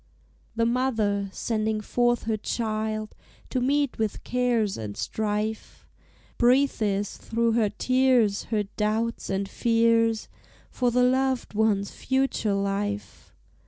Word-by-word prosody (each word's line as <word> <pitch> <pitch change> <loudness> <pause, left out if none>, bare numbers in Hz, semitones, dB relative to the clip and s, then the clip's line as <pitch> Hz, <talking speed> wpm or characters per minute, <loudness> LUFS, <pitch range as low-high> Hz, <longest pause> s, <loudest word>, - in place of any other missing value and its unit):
The 230 0 +2
mother, 225 -5 0
sending 220 0 -1
forth 240 +2 +1
her 220 -1 0
child 215 0 -3 0.4
To 255 - 0
meet 280 0 +1
with 220 -2 -2
cares 240 -5 +1
and 105 -2 -6
strife, 215 - -3 0.5
Breathes 240 -6 +2
through 230 0 0
her 225 -2 +2
tears 250 -2 +2
her 215 -2 0
doubts 215 +3 -2
and 195 0 -1
fears 230 0 +2 0.4
For 250 -1 +1
the 250 +1 +2
loved 260 -1 +1
one's 205 -2 +1
future 265 -6 0
life. 200 +1 -3
220 Hz, 115 wpm, -26 LUFS, 210-245 Hz, 0.5 s, The